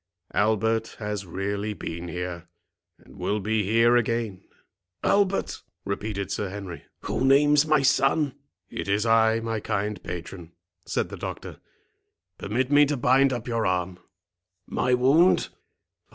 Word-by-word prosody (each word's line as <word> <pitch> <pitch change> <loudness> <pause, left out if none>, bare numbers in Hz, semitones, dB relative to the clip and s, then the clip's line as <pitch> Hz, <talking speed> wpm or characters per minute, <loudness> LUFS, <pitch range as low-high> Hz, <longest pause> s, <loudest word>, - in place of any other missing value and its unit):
Albert 110 +1 +1
has 105 -3 -4
really 100 +4 -3
been 85 -1 -6
here, 85 0 -5 0.5
and - - -17
will 105 - -1
be 110 +2 0
here 115 +4 +4
again." 115 -4 -1 0.6
"Albert!" 200 -1 +1 0.2
repeated 100 0 -3
Sir 100 - -2
Henry, 95 -3 -8 0.2
"who - - -2
names 145 +2 +5
my 155 -2 +3
son?" 135 +1 +2 0.4
"It - - -5
is 100 +2 +1
I, 115 0 +4
my 115 -1 -2
kind 105 +1 -2
patron," 85 -1 -7 0.3
said - - -1
the - - -7
doctor; - - -7 0.8
"permit 125 +6 -1
me 145 0 +6
to 145 0 -1
bind 130 +2 +4
up 120 -2 -4
your 115 -3 0
arm." 90 0 -1 0.7
"My 125 0 +1
wound? 140 +9 +4
110 Hz, 135 wpm, -25 LUFS, 100-125 Hz, 0.8 s, me